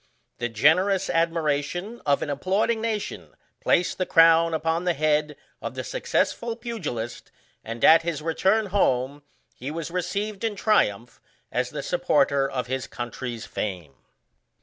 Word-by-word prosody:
The 120 - -1
generous 180 - +3
admiration 165 +5 -1
of 140 -1 +3
an 145 - -3
applauding 195 +9 0
nation 220 -2 -4 0.2
placed 180 +2 +1
the 185 - 0
crown 165 0 +6
upon 165 +1 0
the 175 -2 +1
head 150 0 +1 0.3
of - - -5
the - - -4
successful 235 - -1
pugilist, 175 - -5 0.3
and, 115 +1 -2
at 165 +1 +8
his 165 -3 -3
return 190 +7 +1
home, 140 -6 +1 0.3
he 130 - -7
was 165 +1 -5
received 195 +4 -3
in 225 -2 -1
triumph 120 - +1 0.3
as - - -1
the - - -5
supporter 140 -1 +2
of 125 -1 -3
his 130 +1 -3
country's 120 -1 -6
fame. 90 -8 -5
165 Hz, 140 wpm, -25 LUFS, 135-195 Hz, 0.3 s, at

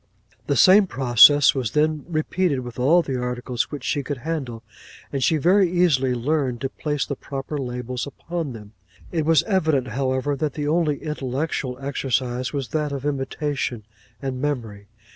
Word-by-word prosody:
'The 140 - +1
same 190 - +6
process 135 +1 +6
was 125 -6 -3
then 155 -1 +1
repeated 155 -2 0
with 120 -1 -8
all 165 +8 +4
the 135 - -3
articles 125 0 -2
which 145 - -7
she 145 - 0
could 140 +1 -4
handle; 130 -5 -4 0.5
and 135 -2 -1
she 160 - +3
very 185 +4 +4
easily 140 -8 +2
learned 130 -1 -1
to 135 - -2
place 150 0 -2
the 140 - -4
proper 135 +2 -6
labels 125 0 -4
upon 165 +1 -5
them. 105 -2 -11 0.4
It 160 -3 -1
was 165 -2 +5
evident, 160 - +1
however, 130 +3 -1
that 145 0 -3
the 145 -1 -2
only 155 -2 0
intellectual 135 -2 -3
exercise 130 -2 -2
was 140 -4 -4
that 150 -2 -1
of 140 -1 -5
imitation 140 -4 -2 0.4
and 130 -1 -3
memory. 115 -8 -3
140 Hz, 160 wpm, -23 LUFS, 125-155 Hz, 0.5 s, same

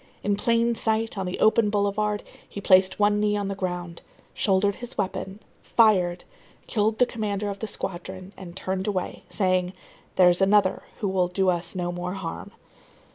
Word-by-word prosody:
In 205 0 +1
plain 230 +2 +2
sight, 225 0 0
on 190 -2 -3
the 180 - -4
open 220 0 +4
boulevard, 205 0 0 0.3
he - - -7
placed 185 -1 +4
one 205 0 +3
knee 210 0 +1
on 200 -1 -2
the 195 - -3
ground, 180 -3 -4 0.3
shouldered 200 0 +1
his 245 +1 -8
weapon, 195 0 -3 0.2
fired, 185 -6 +3 0.4
killed 215 -1 0
the 250 - +5
commander 210 -3 -3
of 200 - -8
the 220 - -4
squadron, 185 0 -6
and 175 -2 -10
turned 190 +1 -3
away, 190 -3 -3
saying: 185 -2 +1 0.4
"There's 180 0 +5
another 195 0 +3 0.2
who 205 - 0
will 185 -2 +1
do 185 +1 +1
us 175 0 -1
no 175 -1 -2
more 175 +1 -4
harm." 190 -4 -6
195 Hz, 170 wpm, -25 LUFS, 185-210 Hz, 0.4 s, the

